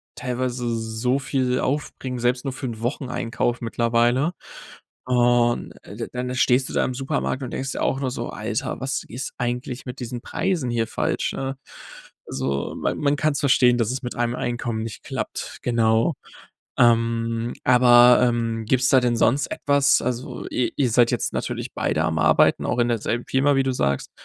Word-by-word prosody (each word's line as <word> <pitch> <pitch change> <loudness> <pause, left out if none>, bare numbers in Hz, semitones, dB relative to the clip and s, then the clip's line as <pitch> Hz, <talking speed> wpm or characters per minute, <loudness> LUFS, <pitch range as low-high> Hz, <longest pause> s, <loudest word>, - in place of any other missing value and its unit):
teilweise 125 -1 -2
so 115 +4 -1
viel 130 -2 0
aufbringen, 130 -2 -3
selbst 125 +2 0
nur 135 - -2
für 130 - -7
'n 115 -3 -5
Wocheneinkauf 120 -1 -2
mittlerweile. 120 +6 +1 0.7
Und, 120 -1 +2
äh, 100 - -11
d 115 - -4
d - - -18
dann 125 0 -3
stehst 130 0 +3
du - - -7
da - - +2
im 130 - -2
Supermarkt 135 0 -2
und 125 - -5
denkst 135 0 -3
dir - - -4
auch 135 - 0
nur 130 -2 -1
so: - - -4
„Alter, - - -4
was 135 0 -2
ist 125 +4 -5
eigentlich 125 +1 -3
mit 125 +1 -7
diesen 120 0 -4
Preisen 170 -6 -1
hier 115 -1 0
falsch“, - - -1
ne? 135 0 -4 0.7
Also, 70 0 -3
man - - -1
man 145 -1 +2
kann's 150 0 +1
verstehen, 125 -3 +4
dass 115 0 0
es 130 0 -4
mit 120 - -5
einem 120 0 -1
Einkommen 120 -2 -3
nicht 115 -3 -7
klappt, - - -5
genau. 115 +3 +2 0.6
Ähm, 115 0 +2
aber, 125 -1 +7
ähm, 115 -2 0
gibt's 130 +2 +2
da 130 - +6
denn 120 -1 +1
sonst 135 +6 +2
etwas 140 -1 +3
also, 125 0 -4
i 125 - -1
ihr 130 -3 +2
seid 120 0 +4
jetzt - - -1
natürlich - - -3
beide - - 0
am 80 0 -1
Arbeiten, 80 +1 +4
auch 125 - -1
in 120 - +3
derselben 115 +1 -1
Firma, 140 +1 +2
wie 135 - +3
du 135 - 0
sagst. 70 - -1
125 Hz, 180 wpm, -23 LUFS, 115-130 Hz, 0.7 s, aber